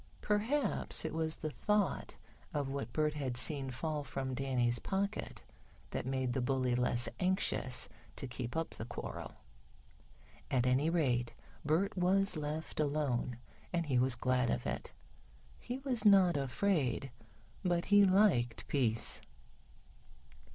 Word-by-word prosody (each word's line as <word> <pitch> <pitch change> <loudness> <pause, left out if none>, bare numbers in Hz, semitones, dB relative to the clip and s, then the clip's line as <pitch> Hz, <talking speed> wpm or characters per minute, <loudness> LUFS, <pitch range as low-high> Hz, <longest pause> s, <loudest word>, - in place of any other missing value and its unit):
Perhaps 220 - 0
it 160 - -3
was 160 0 -1
the 155 - -4
thought 210 +3 0 0.4
of 140 -2 -1
what 135 -4 -4
Bert 155 +1 +1
had 135 -5 -2
seen 135 +1 0
fall 150 +4 -3
from 135 -2 -4
Danny's 125 -3 +1
pocket 200 - -3 0.5
that - - -3
made 130 -2 -1
the 130 - 0
bully 130 0 +1
less 120 -1 +1
anxious 180 -9 +1 0.3
to - - -5
keep 125 +2 -5
up 165 - -2
the 110 - -6
quarrel. 120 - -6 1.2
At 130 -4 +2
any 130 +5 +3
rate, 125 -8 +1 0.3
Bert 160 +7 +1
was 190 +1 +2
left 155 +1 -4
alone 140 -5 0 0.3
and 170 -1 0
he 130 -4 +2
was 130 0 +4
glad 125 -1 +1
of - - -1
it. - - -3 0.7
He 250 - -5
was 260 -5 0
not 195 -5 +6
afraid, 140 - 0 0.5
but 175 -1 +1
he 205 0 +6
liked 185 - +3
peace. 115 -6 +1
145 Hz, 135 wpm, -34 LUFS, 125-180 Hz, 1.2 s, not